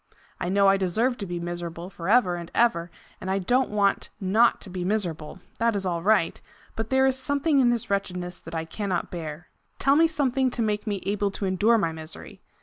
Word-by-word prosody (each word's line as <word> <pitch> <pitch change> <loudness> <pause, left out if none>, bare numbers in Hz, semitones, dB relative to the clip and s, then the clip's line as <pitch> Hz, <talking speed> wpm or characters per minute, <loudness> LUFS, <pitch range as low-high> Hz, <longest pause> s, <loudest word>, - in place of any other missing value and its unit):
I 175 - -2
know 200 +1 +4
I 195 0 +5
deserve 220 +7 +1
to 200 - -4
be 175 0 -4
miserable 175 +1 -5
for 170 0 -5
ever 210 -6 +4
and 170 -1 -7
ever, 175 -8 +2 0.3
and 190 - -5
I 190 - +1
don't 245 +7 +1
want 200 -1 +1
not 215 +5 +3
to - - -7
be 180 -1 -4
miserable 175 -6 -2 0.2
that 230 -1 +2
is 195 -1 -2
all 170 -2 -1
right 200 -2 +2 0.3
but 225 0 -3
there 265 0 +4
is 265 -1 +3
something 285 +2 +1
in 250 -2 +5
this 235 -4 -1
wretchedness 180 -2 -2
that 165 +1 -9
I 160 0 -2
cannot 185 +1 -3
bear. 165 -1 -6 0.3
Tell 275 +1 +3
me 330 +2 +5
something 270 -4 +1
to 240 -1 -2
make 210 0 -1
me 200 -3 -2
able 205 +1 0
to 195 +1 -4
endure 205 +5 +3
my 165 -7 0
misery. 160 0 -9
195 Hz, 215 wpm, -26 LUFS, 175-235 Hz, 0.3 s, I